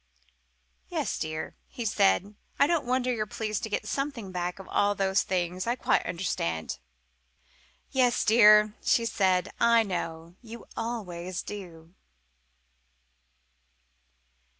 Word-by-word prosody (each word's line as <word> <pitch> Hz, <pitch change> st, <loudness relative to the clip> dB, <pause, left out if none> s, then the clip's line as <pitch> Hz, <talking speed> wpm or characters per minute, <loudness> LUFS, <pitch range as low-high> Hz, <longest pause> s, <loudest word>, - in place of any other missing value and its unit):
"Yes, -, -, -2 dB
dear," 155 Hz, 0 st, -4 dB
he 240 Hz, -, -6 dB
said, 200 Hz, -1 st, +2 dB, 0.2 s
"I -, -, +5 dB
don't 315 Hz, -4 st, 0 dB
wonder 255 Hz, 0 st, +1 dB
you're 215 Hz, -2 st, -2 dB
pleased 215 Hz, -1 st, -3 dB
to 220 Hz, -, -4 dB
get 205 Hz, -, -2 dB
something 275 Hz, -8 st, -3 dB
back 180 Hz, 0 st, -2 dB
out 195 Hz, -, -9 dB
of -, -, -17 dB
all 205 Hz, 0 st, +2 dB
those 195 Hz, 0 st, +2 dB
things. 185 Hz, +1 st, -2 dB
I 240 Hz, -, +1 dB
quite -, -, +1 dB
understand." 85 Hz, -, -2 dB, 1.1 s
"Yes, 250 Hz, -2 st, +2 dB
dear," 210 Hz, -1 st, +7 dB
said 230 Hz, -1 st, +2 dB, 0.4 s
she. -, -, -15 dB
"I 235 Hz, -1 st, +5 dB
know. 170 Hz, -4 st, -5 dB
You 235 Hz, -1 st, -10 dB
always 185 Hz, -6 st, -4 dB
do!" 175 Hz, -5 st, -9 dB
205 Hz, 125 wpm, -28 LUFS, 180-235 Hz, 1.1 s, dear